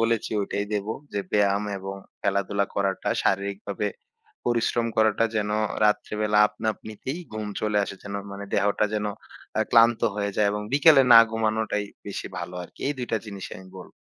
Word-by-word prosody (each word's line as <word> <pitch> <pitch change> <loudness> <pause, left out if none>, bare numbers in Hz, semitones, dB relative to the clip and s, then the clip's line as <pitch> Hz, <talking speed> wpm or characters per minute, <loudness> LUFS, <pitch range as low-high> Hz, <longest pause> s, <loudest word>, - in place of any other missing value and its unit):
বলেছি, 115 -1 +1
ঐটাই 100 +1 -2
দেব। 105 -1 -1 0.3
যে, 100 - -1
ব্যায়াম 100 0 +2
এবং 95 +1 -6 0.3
খেলাধুলা 100 0 0
করাটা 100 -1 -1
শারীরিকভাবে 100 +1 -1 0.6
পরিশ্রম 120 0 +1
করাটা 110 +1 +3
যেন, 105 -1 0 0.3
রাত্রেবেলা 105 0 +1
আপনা-আপনিতেই 110 - -4
ঘুম 110 -1 -4
চলে 105 -1 +1
আসে, 100 - -7
যেন 100 -1 -7 0.2
মানে 100 0 -6
দেহটা 100 +1 +2
যেন, 105 0 -1 0.5
আ - - +4
ক্লান্ত 115 0 +6
হয়ে 100 -1 -1
যায় 105 -1 +3
এবং 105 0 -3
বিকেলে 145 -1 +7
না 115 - +12
ঘুমানোটাই 110 -2 0 0.2
বেশি - - -5
ভালো 90 - -6
আরকি। - - -14
এই 145 - +1
২ 125 - -3
টা - - +4
জিনিসই 100 -2 -7
আমি 95 0 -13
বলব। 90 - -11
105 Hz, 160 wpm, -25 LUFS, 100-110 Hz, 0.6 s, না